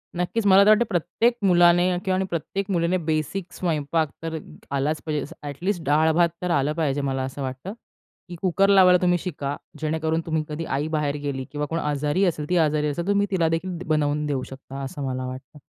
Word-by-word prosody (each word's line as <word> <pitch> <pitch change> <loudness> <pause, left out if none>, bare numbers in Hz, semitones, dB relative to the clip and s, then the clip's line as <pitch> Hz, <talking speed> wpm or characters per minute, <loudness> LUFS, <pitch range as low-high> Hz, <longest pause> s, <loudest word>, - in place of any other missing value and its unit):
नक्कीच, 180 +5 -1
मला 195 0 +7
तर - - +5
वाटतं 215 +2 +5
प्रत्येक 220 +6 +1
मुलाने 175 -1 +5 0.2
किंवा 190 -1 +1
आणि 190 +1 0
प्रत्येक 190 +4 -3
मुलीने 170 0 +1
बेसिक 160 +4 -2
स्वयंपाक 160 -2 -1
तर 165 0 -3 0.4
आलाच 150 +3 0
पाहिजे. 150 -3 -1
जसं - - -12
अ‍ॅटलिस्ट 170 +6 -3
डाळ 155 +2 +3
भात 170 +1 +3
तर 180 -1 -1
आलं 145 -1 +1
पाहिजे. 145 -3 0
मला 135 -1 -1
असं 130 +2 -5
वाटतं, 130 +8 -5 0.6
की 175 - -6
कुकर 195 +1 +2
लावायला 185 -2 +7
तुम्ही 180 -1 +3
शिका. 145 -5 -4 0.2
जेणेकरून 160 +1 -1
तुम्ही 160 -1 -1
कधी 155 +2 -4
आई 150 - -1
बाहेर 150 -2 0
गेली 135 -2 -2
किंवा 150 0 -2
कोण 165 - -1
आजारी 150 +5 0
असेल, 155 -4 -2
ती 180 - +2
आजारी 150 -2 +2
असेल, 150 +4 -2
तर - - -9
तुम्ही 200 0 +2
तिला 175 -4 +2
देखील 170 +2 -2
द 175 - -7
बनवून 150 -1 +1
देऊ 140 -3 -1
शकता 135 +1 -9
असं 140 +1 -6
मला 130 0 -3
वाटतं. 130 +3 -9
160 Hz, 205 wpm, -24 LUFS, 145-180 Hz, 0.6 s, मला